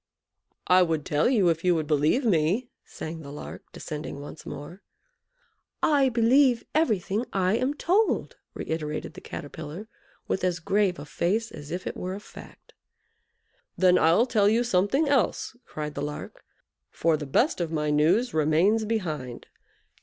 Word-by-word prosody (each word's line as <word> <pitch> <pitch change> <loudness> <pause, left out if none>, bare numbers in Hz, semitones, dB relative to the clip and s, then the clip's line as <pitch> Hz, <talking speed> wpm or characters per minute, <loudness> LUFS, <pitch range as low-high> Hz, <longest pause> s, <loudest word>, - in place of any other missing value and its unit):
"I 180 0 +5
would 160 -4 0
tell 150 +9 +2
you 205 -9 +3
if 165 0 -1
you 180 -1 +3
would 160 -2 -1
believe 155 - +2
me," 195 +5 +1
sang 160 +1 -7
the 140 -3 -9
Lark, 145 - -9
descending 150 -2 -6
once 145 +2 -10
more. 170 +7 -8 1.0
"I 280 -3 +4
believe 245 +1 +4
everything 220 - +1
I 190 +1 +1
am 265 +4 -1
told," 395 +8 +1 0.2
reiterated 155 -1 -4
the - - -11
Caterpillar, 155 +7 -8 0.4
with 190 - -1
as 180 -1 +1
grave 190 +2 +1
a 145 - -8
face 210 +9 -1
as 145 - -10
if 180 +3 -4
it - - -4
were 185 +1 -4
a - - -6
fact. 205 - -14 1.0
"Then 180 -1 +5
I'll 165 +9 +4
tell 210 -5 +3
you 230 +3 +2
something 240 - +2
else," 275 -3 +1
cried 150 -1 -5
the 140 - -5
Lark; 150 +1 -6 0.5
"for 165 -1 +1
the 150 -1 -5
best 235 - +2
of 165 -2 -2
my 150 -2 0
news 175 +12 +2
remains 165 +9 +3
behind. 155 - -3
180 Hz, 155 wpm, -26 LUFS, 155-225 Hz, 1.0 s, I